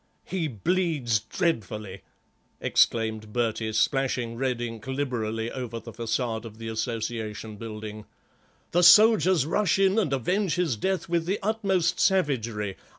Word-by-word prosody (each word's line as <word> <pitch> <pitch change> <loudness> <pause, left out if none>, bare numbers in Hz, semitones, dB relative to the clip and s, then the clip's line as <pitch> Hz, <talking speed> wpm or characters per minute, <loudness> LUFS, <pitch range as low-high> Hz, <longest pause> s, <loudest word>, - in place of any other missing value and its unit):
"He 180 -4 -2
bleeds 145 - 0
dreadfully," 110 - -3 0.6
exclaimed 110 -2 +1
Bertie, 110 -1 -1
splashing 125 0 0
red 125 -1 -1
ink 115 -1 -6
liberally 115 -5 -2
over 120 -3 -5
the 115 +1 -10
façade 115 -1 -2
of 110 -2 -10
the 115 0 -6
Association 110 -1 -4
building. 110 -1 -7 0.7
"The 175 - +3
soldiers 190 - +6
rush 195 +6 +1
in 195 +2 +3
and 180 -10 0
avenge 180 - 0
his 175 -8 0
death 190 - -1
with 170 -1 0
the 195 +3 +1
utmost 190 -5 +1
savagery. 115 - +1
120 Hz, 130 wpm, -26 LUFS, 110-170 Hz, 0.7 s, soldiers